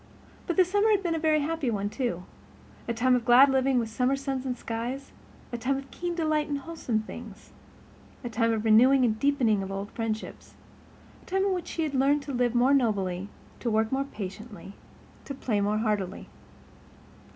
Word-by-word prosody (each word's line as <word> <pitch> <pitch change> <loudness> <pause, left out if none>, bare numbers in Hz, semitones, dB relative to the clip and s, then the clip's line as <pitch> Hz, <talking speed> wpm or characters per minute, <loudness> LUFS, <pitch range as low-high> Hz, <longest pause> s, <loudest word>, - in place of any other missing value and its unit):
But 345 - -1
the 370 - +6
summer 410 +4 +2
had 405 -2 +3
been 345 -2 0
a 325 - -1
very 310 -1 +2
happy 310 -3 -1
one, 205 -3 -1
too—a 235 0 -6
time 250 +2 +3
of 245 - 0
glad 255 +4 +7
living 265 0 +2
with 235 -2 +1
summer 250 +4 +1
suns 270 -1 -3
and 250 -1 -2
skies, 240 +5 -5 0.4
a 240 - -3
time 270 +3 0
of 275 0 -9
keen 350 0 -4
delight 310 -2 0
in 290 - -1
wholesome 280 -6 -3
things; 220 -2 -11 0.7
a - - -3
time 230 +1 +1
of 220 -1 -1
renewing 250 +4 +6
and 220 -2 0
deepening 245 -7 +2
of 195 0 -5
old 195 +1 -5
friendships; 225 -1 -5 0.7
a - - -22
time 385 +1 +1
in 395 - +1
which 360 -2 -4
she 330 - -2
had 300 -2 -2
learned 280 +2 +2
to 280 - -6
live 245 -1 +1
more 250 +3 +4
nobly, 200 -7 0 0.3
to 240 - -2
work 220 0 +1
more 270 +1 0
patiently, 205 -2 -8 0.5
to 275 - -6
play 220 -6 -1
more 205 +1 +1
heartily. 210 -4 -2
250 Hz, 190 wpm, -27 LUFS, 220-280 Hz, 0.7 s, glad